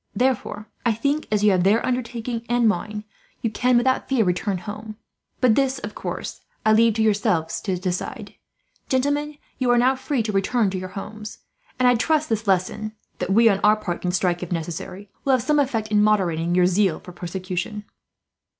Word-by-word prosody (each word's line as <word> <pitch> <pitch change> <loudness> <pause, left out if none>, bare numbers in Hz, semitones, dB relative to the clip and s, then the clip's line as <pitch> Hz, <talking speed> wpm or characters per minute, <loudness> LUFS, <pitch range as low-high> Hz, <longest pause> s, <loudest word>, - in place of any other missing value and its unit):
Therefore 235 -4 -1 0.2
I 235 -2 +2
think, 280 +7 -1
as 210 -1 +1
you 210 - +6
have 185 -2 +2
their 205 +5 +3
undertaking 240 -2 -2
and 240 -1 +3
mine, 210 +2 -1 0.4
you 230 - 0
can 250 +2 +2
without 260 +2 +1
fear 260 -4 +3
return 180 +2 0
home; 210 +4 -7 0.4
but 250 -4 +4
this, 270 +1 +1
of - - -6
course, - - -5 0.2
I 215 - +5
leave 225 0 +4
to 220 - +2
yourself 180 -6 +1
to 190 -3 -2
decide. 180 0 -4 0.6
"Gentlemen, 285 +3 0 0.2
you 255 -2 +1
are 245 - +5
now 255 +2 +4
free 265 -2 -1
to 215 - -2
return 200 +1 +1
to 185 - -3
your 185 0 -6
homes; 215 +2 -7 0.4
and 255 - +3
I 245 - +6
trust 310 +6 +1
this 225 -1 -1
lesson 195 +3 0 0.3
that - - -2
we, 230 +4 +6
on 200 -3 +3
our 210 +1 +6
part, 185 -5 -4
can 180 - -1
strike, 180 -1 0
if 180 - -6
necessary 175 +4 -5 0.2
will 275 - +3
have 255 -3 +2
some 300 +2 +2
effect 230 -6 0
in 210 -1 +3
moderating 175 -5 +2
your 180 -1 +5
zeal 185 -1 +2
for 180 - -11
persecution." 185 +4 -4
215 Hz, 195 wpm, -23 LUFS, 185-245 Hz, 0.6 s, you